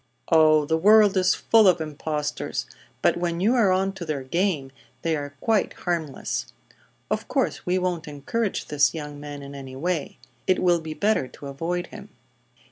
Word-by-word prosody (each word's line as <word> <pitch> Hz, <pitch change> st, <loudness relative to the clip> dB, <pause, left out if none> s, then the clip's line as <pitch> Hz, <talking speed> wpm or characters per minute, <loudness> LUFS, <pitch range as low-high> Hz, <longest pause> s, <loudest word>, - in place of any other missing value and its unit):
"Oh, 155 Hz, -2 st, +5 dB
the 160 Hz, +2 st, +1 dB
world 210 Hz, +2 st, +6 dB
is 185 Hz, -1 st, +3 dB
full 225 Hz, -3 st, +4 dB
of 180 Hz, -2 st, +5 dB
impostors; 150 Hz, -1 st, -3 dB, 0.4 s
but -, -, +3 dB
when 170 Hz, -1 st, -1 dB
you 210 Hz, +7 st, +3 dB
are 225 Hz, -7 st, +4 dB
on 190 Hz, +1 st, +1 dB
to 190 Hz, -, -7 dB
their 150 Hz, -5 st, -3 dB
game 155 Hz, -2 st, -1 dB, 0.3 s
they 165 Hz, -1 st, +1 dB
are 145 Hz, -1 st, -5 dB
quite 220 Hz, -3 st, +1 dB
harmless. 160 Hz, -, -3 dB, 0.6 s
Of -, -, -1 dB
course -, -, -1 dB
we 180 Hz, +1 st, +2 dB
won't 180 Hz, -4 st, -2 dB
encourage 170 Hz, +10 st, -2 dB
this 150 Hz, +2 st, +2 dB
young 150 Hz, -2 st, -6 dB
man 145 Hz, -1 st, -8 dB
in 140 Hz, 0 st, -9 dB
any 135 Hz, -2 st, -8 dB
way. 165 Hz, +1 st, -2 dB, 0.3 s
It 185 Hz, -, +4 dB
will 175 Hz, -2 st, +2 dB
be 155 Hz, -1 st, -6 dB
better 205 Hz, -9 st, +1 dB
to 140 Hz, -, -13 dB
avoid 165 Hz, +6 st, -3 dB
him." 210 Hz, -1 st, -10 dB
165 Hz, 175 wpm, -24 LUFS, 145-185 Hz, 0.6 s, world